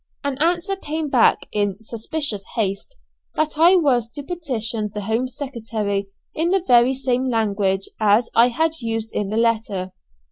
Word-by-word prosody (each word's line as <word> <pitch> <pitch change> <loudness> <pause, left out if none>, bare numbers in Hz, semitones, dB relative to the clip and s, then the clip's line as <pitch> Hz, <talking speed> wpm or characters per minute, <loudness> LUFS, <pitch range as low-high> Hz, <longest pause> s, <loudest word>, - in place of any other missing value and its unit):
An 280 -1 -1
answer 345 +5 +1
came 315 -4 -4
back, 245 -4 +3
in 205 -2 -1
suspicious 225 +1 -3
haste, 205 - -2 0.4
that 310 0 -1
I 345 +3 +7
was 255 -9 +2
to 290 - -5
petition 235 -10 -1
the 210 - -5
Home 225 +5 -1
Secretary 225 -7 -3 0.3
in 325 +2 0
the 380 -1 +1
very 245 0 +5
same 260 -1 0
language 200 -4 0
as 215 +2 +3
I 235 +1 +6
had 320 +7 +1
used 225 -1 -3
in 205 -2 -2
the 215 - -2
letter. 220 -5 0
235 Hz, 155 wpm, -21 LUFS, 215-290 Hz, 0.4 s, I